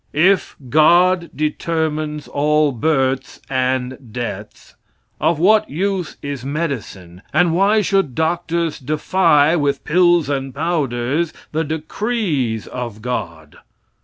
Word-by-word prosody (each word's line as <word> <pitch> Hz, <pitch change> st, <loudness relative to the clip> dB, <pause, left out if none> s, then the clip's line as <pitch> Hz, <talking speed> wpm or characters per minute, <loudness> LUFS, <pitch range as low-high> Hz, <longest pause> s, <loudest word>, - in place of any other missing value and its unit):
If 185 Hz, +6 st, +2 dB
"God" 170 Hz, +5 st, +4 dB
determines 155 Hz, -1 st, -2 dB
all 150 Hz, +1 st, +2 dB
births 135 Hz, 0 st, 0 dB
and 130 Hz, -1 st, -1 dB
deaths, 110 Hz, -3 st, -7 dB, 0.5 s
of 170 Hz, -, +2 dB
what 210 Hz, +6 st, +4 dB
use 185 Hz, +2 st, -2 dB
is 140 Hz, -3 st, -5 dB
medicine, 125 Hz, -, -5 dB
and 175 Hz, -2 st, +3 dB
why 200 Hz, +5 st, +3 dB
should 195 Hz, -, 0 dB
doctors 165 Hz, 0 st, -1 dB
defy, 155 Hz, +2 st, +2 dB
with 145 Hz, -4 st, 0 dB
pills 175 Hz, -1 st, +3 dB
and 135 Hz, -2 st, -3 dB
powders, 150 Hz, -1 st, -1 dB, 0.2 s
the 160 Hz, +1 st, 0 dB
decrees 155 Hz, -, -2 dB
of 120 Hz, -4 st, -6 dB
"God"? 85 Hz, -11 st, -5 dB
150 Hz, 105 wpm, -19 LUFS, 130-170 Hz, 0.5 s, God